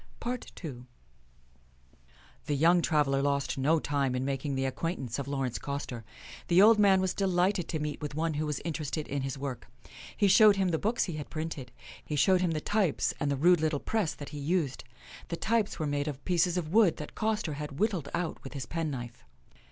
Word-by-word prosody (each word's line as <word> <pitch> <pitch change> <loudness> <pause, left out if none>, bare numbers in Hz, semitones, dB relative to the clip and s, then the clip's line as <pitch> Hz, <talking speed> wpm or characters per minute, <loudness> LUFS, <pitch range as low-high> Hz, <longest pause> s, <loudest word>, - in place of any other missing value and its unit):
II 250 +1 -1 2.1
The 145 - +1
young 170 +5 +4
traveler 145 -4 +2
lost 140 -1 0
no 155 +5 +3
time 140 -3 0
in 125 +1 -1
making 140 +1 -2
the 135 0 0
acquaintance 135 -3 -3
of 140 - -4
Laurence 135 -5 -2
Coster. 140 -4 -5 0.4
The 175 +1 +4
old 215 +2 +7
man 195 -2 +5
was 190 -1 0
delighted 185 -2 +1
to 165 - -2
meet 150 -1 -4
with 150 -1 -5
one 160 +1 0
who 150 +1 -2
was 150 - -2
interested 155 -2 -3
in 140 0 -2
his 135 +1 -3
work. 135 -2 -5 0.5
He 200 - +4
showed 205 +2 +7
him 190 -2 +1
the 160 -2 0
books 225 +3 +1
he 170 -5 -4
had 150 - -6
printed. 155 -6 -5 0.3
He 150 - -4
showed 185 +5 +4
him 180 - +2
the 160 -2 -1
types 200 -6 +1
and 145 - 0
the 140 - 0
rude 175 +3 +5
little 155 -2 +1
press 215 -3 -1
that 145 - -8
he 150 - -7
used. 150 -2 -1 0.4
The 170 - -4
types 225 0 0
were 155 - -2
made 145 0 -1
of 140 -2 -6
pieces 180 0 +2
of 165 -1 -3
wood 210 -7 +5
that 150 - -7
Coster 215 -7 -1
had 150 -1 -6
whittled 190 - 0
out 170 -2 -3
with 135 - -8
his 135 -5 -4
penknife. 135 -7 -4
155 Hz, 200 wpm, -30 LUFS, 140-180 Hz, 2.1 s, old